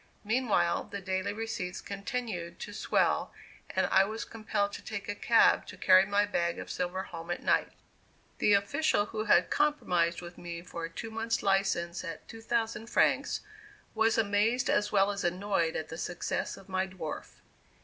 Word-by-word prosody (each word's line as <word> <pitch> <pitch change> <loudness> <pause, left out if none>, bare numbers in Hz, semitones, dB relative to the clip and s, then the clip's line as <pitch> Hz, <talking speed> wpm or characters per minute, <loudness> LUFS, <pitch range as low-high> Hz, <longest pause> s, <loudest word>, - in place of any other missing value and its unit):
Meanwhile, 215 -6 +1
the 200 - -6
daily 190 +1 -2
receipts 205 -4 -4
continued 200 -4 -4
to 205 - -6
swell, - - +1 0.4
and - - +1
I 190 - +5
was 220 +3 -4
compelled 215 -2 -2
to - - -6
take 200 -2 -6
a 205 - -1
cab 230 +2 +4
to - - -9
carry 185 0 +6
my 205 0 +3
bag 170 -4 -1
of - - -6
silver 180 +1 -2
home 165 -2 -9
at 175 - -3
night. - - +2 0.7
The 210 - +4
official, 205 +3 +2
who 215 0 -4
had 210 - +4
compromised 180 - +1
with 175 0 -10
me 170 -1 -6
for 170 -2 -5
a - - -6
two 195 +7 -7
months' 225 +1 -1
license 195 -3 +1
at 165 -3 -7
2,000 225 0 -2
francs, - - +2 0.5
was 225 +1 +2
amazed 220 +3 +2
as 210 - +1
well 200 0 +4
as 200 0 -4
annoyed 175 -2 0
at 155 -1 -3
the 160 - -7
success 175 -1 -3
of 195 - -14
my 190 0 0
"dwarf." 175 -5 -6
200 Hz, 170 wpm, -30 LUFS, 175-220 Hz, 0.7 s, carry